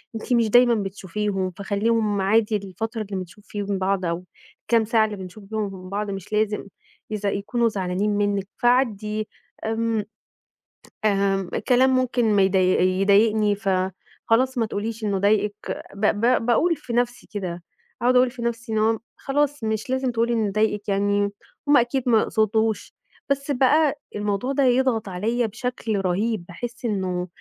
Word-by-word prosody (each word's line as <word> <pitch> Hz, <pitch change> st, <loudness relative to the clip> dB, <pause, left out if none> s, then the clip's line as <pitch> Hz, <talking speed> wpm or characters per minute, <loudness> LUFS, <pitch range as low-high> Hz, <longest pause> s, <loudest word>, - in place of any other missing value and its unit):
أنتِ 225 Hz, +3 st, -2 dB
مش 230 Hz, -2 st, +3 dB
دايمًا 245 Hz, +1 st, +6 dB
بتشوفيهم، 195 Hz, -1 st, -2 dB
فخليهم 205 Hz, +2 st, 0 dB
عادي 215 Hz, +2 st, +2 dB
الفترة 220 Hz, +4 st, -5 dB
اللي 200 Hz, -2 st, -4 dB
بنشوف 185 Hz, +3 st, -9 dB
فيهم 205 Hz, -1 st, -3 dB
بعض 190 Hz, 0 st, 0 dB
أو 170 Hz, +1 st, -2 dB, 0.4 s
الكام 225 Hz, -1 st, +2 dB
ساعة 220 Hz, 0 st, +3 dB
اللي 215 Hz, -1 st, -4 dB
بنشوف 190 Hz, +3 st, -9 dB
فيهم 195 Hz, -4 st, -4 dB
بعض 205 Hz, +1 st, -2 dB
مش 195 Hz, +1 st, -7 dB
لازم 210 Hz, -1 st, 0 dB, 0.4 s
إذا 210 Hz, -1 st, -1 dB
يكونوا 230 Hz, +4 st, 0 dB
زعلانين 195 Hz, 0 st, -1 dB
منِك، 205 Hz, -1 st, 0 dB
فعدّي 215 Hz, -4 st, +1 dB, 0.4 s
آمم، 225 Hz, -1 st, 0 dB, 1.0 s
آمم، 195 Hz, -2 st, +1 dB, 0.2 s
كلام 255 Hz, +1 st, +5 dB
ممكن 245 Hz, -3 st, +1 dB
ما 200 Hz, -, +4 dB
يض 190 Hz, 0 st, +2 dB
يضايقني، 200 Hz, +3 st, +3 dB
فخلاص 200 Hz, +6 st, -1 dB
ما 230 Hz, -, +2 dB
تقوليش 220 Hz, +1 st, -4 dB
إنه 200 Hz, -2 st, 0 dB
ضايقِك، 205 Hz, +1 st, 0 dB
ب 200 Hz, -, -1 dB
ب 235 Hz, 0 st, +2 dB
باقول 320 Hz, +8 st, +3 dB
في 240 Hz, -, -8 dB
نَفْسي 240 Hz, 0 st, -1 dB
كده، 180 Hz, -4 st, -4 dB, 0.4 s
أقعد 250 Hz, +1 st, +3 dB
أقول 250 Hz, -1 st, +5 dB
في 245 Hz, -2 st, -9 dB
نَفْسي 235 Hz, 0 st, -3 dB
إن -, -, +1 dB
هو 220 Hz, +1 st, +2 dB, 0.2 s
خلاص 290 Hz, -2 st, -1 dB
مش 220 Hz, +2 st, -2 dB
لازم 260 Hz, 0 st, 0 dB
تقولي 235 Hz, 0 st, +1 dB
إنه 215 Hz, -3 st, 0 dB
ضايقِك 210 Hz, 0 st, 0 dB
يعني، 200 Hz, 0 st, +1 dB, 0.4 s
هُم 290 Hz, 0 st, +6 dB
أكيد 245 Hz, +2 st, +1 dB
ما 225 Hz, -2 st, +5 dB
يقصدوش، 220 Hz, 0 st, 0 dB, 0.4 s
بس 280 Hz, +1 st, 0 dB
بقى 285 Hz, +3 st, +3 dB, 0.2 s
الموضوع 205 Hz, +5 st, -1 dB
ده 275 Hz, -, +2 dB
يضغط 250 Hz, -5 st, +2 dB
عليَّ 225 Hz, +6 st, 0 dB
بشكل 225 Hz, -1 st, -3 dB
رهيب، 190 Hz, +1 st, -1 dB
باحس 240 Hz, +8 st, -7 dB
إنه 185 Hz, -4 st, -1 dB
215 Hz, 155 wpm, -23 LUFS, 200-235 Hz, 1.0 s, دايمًا